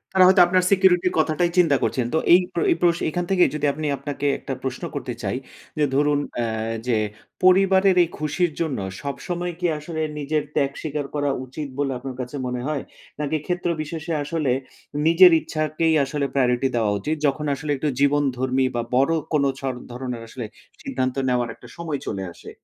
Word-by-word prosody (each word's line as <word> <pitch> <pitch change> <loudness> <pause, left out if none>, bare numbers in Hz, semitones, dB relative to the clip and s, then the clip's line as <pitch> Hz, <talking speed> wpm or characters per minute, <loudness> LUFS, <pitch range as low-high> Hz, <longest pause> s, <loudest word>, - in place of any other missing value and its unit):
তারা 185 - +7
হয়তো 190 0 +6
আপনার 185 +1 +3
সিকিউরিটি 185 -2 +4
র - - -8
কথাটাই 155 +2 +2
চিন্তা 165 -5 +5
করছেন। 125 -3 0
তো 160 - +3 0.2
এই 180 - +9
প্র 170 - -1
এই - - +4
প্র 175 - +6 0.2
এখান 175 +3 -2
থেকে 180 -2 +5
যদি 150 -1 -1
আপনি, 155 0 -3
আপনাকে 140 +1 -5
একটা 135 - -5
প্রশ্ন 130 +5 -4
করতে 135 -3 -3
চাই। - - -1 0.4
যে, 150 - +3
ধরুন, 145 0 +3 0.2
অ্যা 115 -1 -1 0.4
যে, 115 - +2 0.5
পরিবারের 190 0 +5
এই 165 - -3
খুশির 155 +3 0
জন্য, 155 -8 -1 0.2
সবসময় 175 - -4
কি 180 - +1
আসলে 160 +1 -5 0.2
নিজের 150 +1 0
ত্যাগ 140 -1 +2
স্বীকার 150 -2 -3
করা 145 -1 +1 0.2
উচিত 140 +3 -6
বলে, 140 -1 +1
আপনার 130 -1 -6
কাছে 125 +3 -6
মনে 125 0 -3
হয়? 150 -3 -1 0.4
নাকি 150 +1 0
ক্ষেত্র 175 -1 -1
বিশেষে 160 +2 -4
আসলে, 150 -3 -1 0.6
নিজের 175 +2 +8
ইচ্ছাকেই 155 +1 0
আসলে 140 +1 -2
প্রায়োরিটি 125 -1 +2
দেওয়া 110 -3 +2
উচিত, 155 +1 -1
যখন 150 +2 -1
আসলে 145 +2 -4
একটু 150 - -2
জীবনধর্মী 135 -2 +2
বা 120 - +1
বড় 135 +5 +3 0.2
কোন 145 -2 +3 0.2
ছর 135 -1 -2 0.2
ধরনের 125 -1 -5
আসলে 120 0 -6 0.4
সিদ্ধান্ত 130 0 -2
নেওয়ার 125 -1 +1
একটা - - -15
সময় 160 -4 -3
চলে 95 -2 -3
আসে? - - -12
150 Hz, 185 wpm, -23 LUFS, 135-170 Hz, 0.6 s, এই